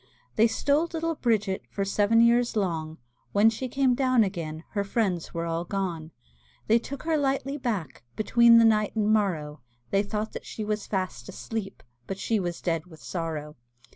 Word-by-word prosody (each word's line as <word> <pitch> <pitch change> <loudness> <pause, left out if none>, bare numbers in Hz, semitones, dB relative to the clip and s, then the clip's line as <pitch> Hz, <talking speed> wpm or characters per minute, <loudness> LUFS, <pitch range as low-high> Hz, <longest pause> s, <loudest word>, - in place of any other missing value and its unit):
They 225 +2 +5
stole 285 +7 +1
little 330 0 -2
Bridget 215 -9 0
For 200 - -2
seven 205 +3 +3
years 235 0 +3
long; 165 -6 -2 0.4
When 210 +2 +5
she 255 +4 -4
came 265 0 +2
down 255 -2 +3
again 165 -5 -4
Her 200 -2 -1
friends 195 -5 -1
were 170 0 -3
all 165 0 -2
gone. 175 -5 -3 0.6
They 230 +2 +4
took 275 +3 -7
her 320 -1 +1
lightly 275 0 0
back, 205 - -3
Between 235 +2 +5
the 230 - +7
night 215 -1 +2
and 215 -1 +2
morrow, 160 -8 -1 0.3
They 195 - +3
thought 210 +1 -3
that - - -7
she 220 - -5
was 210 0 -2
fast 185 - -3
asleep, 215 -4 -6 0.2
But 195 - -4
she 220 +2 0
was 175 -2 -4
dead 165 -1 -1
with 160 -3 -14
sorrow. 155 -4 -4
210 Hz, 175 wpm, -27 LUFS, 175-235 Hz, 0.6 s, the